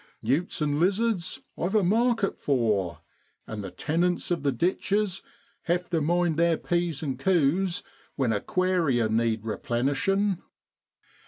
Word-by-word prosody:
Newts 150 - 0
and 145 0 0
lizards 195 +1 0
I've 185 +5 -2
a 210 - +4
market 225 +2 +2
for, 105 - 0 0.4
and 105 -2 -6
the 95 - -5
tenants 170 - -1
of 170 - +1
the 140 -1 +1
ditches 195 +4 0 0.4
have 175 +1 -1
to 165 -2 +1
mind 170 +1 +1
their 170 -1 +3
P's 170 -4 -1
and 135 -4 -3
Q's 175 +2 +2 0.3
when 130 -5 +1
aquaria 155 - +1
need 110 -1 0
replenishing.' 145 - 0
170 Hz, 130 wpm, -27 LUFS, 130-185 Hz, 0.4 s, a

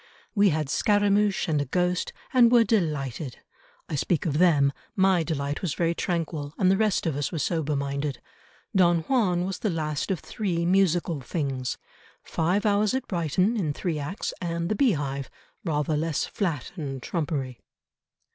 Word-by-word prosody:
We 205 -2 +4
had 155 -3 0
Scaramouch 205 +4 +2
and 150 -3 +1
a - - -1
ghost, 180 +5 0 0.2
and 240 -2 +6
were 240 -2 +7
delighted. 150 - -1 0.5
I - - -7
speak 155 +4 0
of 150 -2 0
them; 145 -6 +4 0.2
my 190 -3 +4
delight 145 -3 -2
was 165 -7 -2
very 170 -1 +1
tranquil, 165 -4 -3
and 185 -2 +4
the - - +4
rest 215 -3 +1
of 160 -4 0
us 145 0 -2
were 170 - -3
sober 155 -1 0
minded. 140 0 -2 0.6
Don 175 -3 +4
Juan 180 -4 +1
was 190 0 -4
the 215 - 0
last 155 -2 -2
of 190 -4 0
three 175 -6 -2
musical 175 -4 +2
things. 130 -2 -3 0.5
Five 180 +6 0
Hours 210 +2 +2
at 260 -1 -2
Brighton, 180 - +1
in 165 -9 -1
three 165 -1 -2
acts, 150 +8 -4
and 170 -1 -2
the 215 - +1
Beehive 145 - 0 0.3
rather 150 -2 0
less 155 0 0
flat 165 - -3
and 140 -6 -4
trumpery." 140 -5 -3
170 Hz, 165 wpm, -26 LUFS, 145-190 Hz, 0.6 s, were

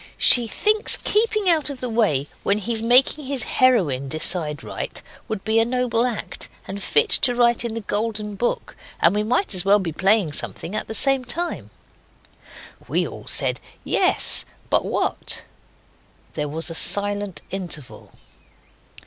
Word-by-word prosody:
She 240 -2 +6
thinks 425 - +4
keeping 430 -1 0
out 320 -4 +2
of 280 -2 -7
the 255 - -4
way 215 - 0 0.2
when 200 - 0
he's 220 +2 0
making 255 +5 +3
his 270 -4 0
heroine 170 - +1
decide 155 0 0
right - - -5 0.3
would 215 -3 -5
be 220 +1 +1
a - - +4
noble 245 0 0
act, 210 -6 -5 0.2
and 200 +1 -6
fit 445 - +2
to 245 -2 +1
write 240 -1 +2
in 230 -2 -4
the 230 - -4
Golden 210 0 -3
Book; 240 +4 -3 0.2
and 170 - +3
we 210 - 0
might 245 - 0
as 180 -2 +1
well 200 +1 +4
be 185 -5 -3
playing 195 -1 +1
something 170 - -3
at 215 - -3
the 220 - -2
same 270 0 +3
time.' 335 +8 -4 1.2
We - - 0
all - - -11
said - - -1 0.2
'Yes, - - +1 0.3
but - - +3
what?' - - -1 0.9
There 150 -1 -3
was 160 +3 0
a - - -5
silent 205 +2 0
interval. 175 -8 -7
220 Hz, 155 wpm, -22 LUFS, 190-250 Hz, 1.2 s, She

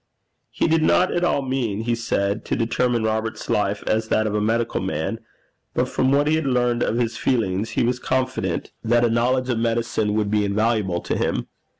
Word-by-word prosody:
He - - 0
did 160 0 +3
not 180 +3 +3
at 175 - 0
all 145 -5 +1
mean, 125 -6 -1
he 120 +1 0
said, 105 -2 -1
to - - -1
determine 120 0 0
Robert's 110 0 -2
life 100 0 0
as 110 0 0
that 110 0 +1
of 105 - -1
a 105 - +1
medical 115 +2 0
man, 110 +8 -2 0.6
but - - +1
from 130 0 +1
what 140 +1 +3
he 155 - +2
had 160 -3 -2
learned 125 -2 +1
of 115 - 0
his 120 -1 -1
feelings, 110 -4 0
he - - +3
was 125 +1 0
confident 130 0 -2
that 120 +1 +3
a 115 - +1
knowledge 125 +2 +1
of 120 -3 0
medicine 115 -2 0
would 105 -1 0
be 105 -1 +2
invaluable 100 -3 0
to - - -2
him. - - -1
115 Hz, 205 wpm, -22 LUFS, 110-125 Hz, 0.6 s, did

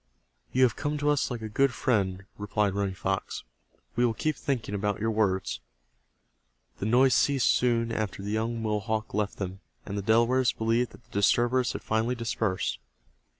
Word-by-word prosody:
"You 130 - +3
have 120 -3 +3
come 150 +1 -2
to 145 0 +2
us 145 - +1
like 120 -3 -5
a - - -3
good 135 +5 +2
friend," 100 -6 0
replied 105 -1 0
Running 100 -1 -1
Fox. - - -3 0.5
"We 120 - +2
will 115 -2 +2
keep 155 +6 0
thinking 130 -8 -2
about 100 0 -1
your 110 +1 0
words." 100 -4 0 1.2
The 100 - -1
noise 125 +3 +5
ceased 135 0 +3
soon 115 -2 +2
after 110 -3 -3
the 100 - -3
young 115 +2 -1
Mohawk 110 0 -1
left 105 0 -1
them, 95 0 -4 0.3
and 100 - -5
the 100 - -1
Delawares 120 +4 +3
believed 115 +2 0
that - - -16
the - - -31
disturbers 120 +5 +2
had - - -6
finally 110 +3 0
dispersed. 110 - -1
110 Hz, 175 wpm, -28 LUFS, 105-125 Hz, 1.2 s, noise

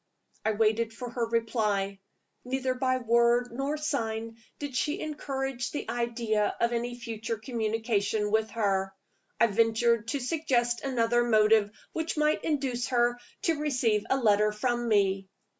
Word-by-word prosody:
I 220 - +1
waited 225 +1 +1
for 245 0 -7
her 235 -1 -1
reply. 215 -4 0 0.4
Neither 260 +1 -1
by 255 0 +1
word 235 0 +3
nor 275 +5 -2
sign 230 -7 -2 0.2
did 285 -3 -6
she 295 +3 0
encourage 270 -4 -3
the 295 - -5
idea 235 -3 0
of 235 0 +1
any 240 +1 -2
future 230 -1 -4
communication 220 -2 -1
with 220 0 +2
her. 195 -3 0 0.4
I - - +6
ventured 225 +1 +2
to 280 +5 -1
suggest 245 -4 0
another 240 -3 +2
motive 215 -2 +4 0.2
which 320 0 -2
might 300 0 +2
induce 270 -6 -1
her 240 -1 +2 0.2
to 325 -3 +1
receive 250 -8 +1
a 265 - +3
letter 210 -3 +3
from 240 +2 -1
me. 195 -3 +2
235 Hz, 140 wpm, -28 LUFS, 220-255 Hz, 0.4 s, I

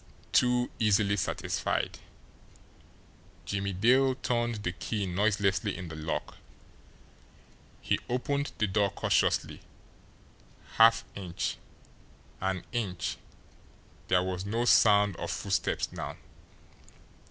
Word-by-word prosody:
TOO 125 0 +3
easily 100 -2 +3
satisfied! 100 - -2 1.5
Jimmie 100 -1 -2
Dale 130 +7 +4
turned 120 -4 -1
the 90 - -1
key 100 +3 -3
noiselessly 100 0 +1
in 90 -3 -7
the 80 - -7
lock. 80 +1 -4 1.4
He - - 0
opened 140 +3 -1
the 105 - +2
door 100 0 +1
cautiously - - 0 1.2
half 115 0 +6
inch 90 -4 -4 0.8
an 95 -1 -2
inch, 105 -7 -2 0.9
there 90 0 +3
was 90 0 -3
no 115 +4 -1
sound 105 -4 +5
of - - -4
footsteps - - -1
now. - - -6
105 Hz, 95 wpm, -29 LUFS, 95-120 Hz, 1.5 s, half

